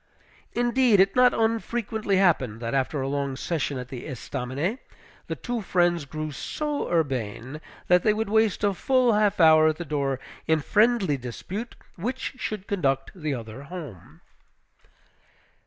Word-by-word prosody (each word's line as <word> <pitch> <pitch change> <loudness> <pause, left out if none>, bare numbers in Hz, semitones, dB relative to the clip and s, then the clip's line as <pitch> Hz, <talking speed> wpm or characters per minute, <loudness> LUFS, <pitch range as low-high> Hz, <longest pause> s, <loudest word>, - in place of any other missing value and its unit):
Indeed, 240 -3 +3
it 195 +1 +4
not 250 0 +6
unfrequently 225 -2 0
happened, 135 - +2
that, 115 0 -4
after 135 +1 0
a - - -2
long 140 -1 -2
session 145 -1 -2
at 125 0 -6
the 125 -2 -7
Estaminet, 140 - -3 0.5
the - - -3
two 245 -2 -3
friends 175 -4 +1
grew 155 +2 -5
so 295 - -3
urbane 135 -3 -2 0.3
that 180 0 +5
they 215 - +3
would 220 +1 -1
waste 220 0 +2
a 200 -1 +3
full 255 +4 +2
half 210 -1 +2
hour 155 -1 +7
at 155 - +2
the 175 - -5
door 140 -3 -1 0.3
in 160 0 +3
friendly 210 -2 +2
dispute 180 - -6 0.2
which 245 +9 -3
should 210 -5 -4
conduct 135 -10 0
the 155 -6 -3
other 115 +1 -8
home. 150 - -10
170 Hz, 150 wpm, -26 LUFS, 135-215 Hz, 0.5 s, hour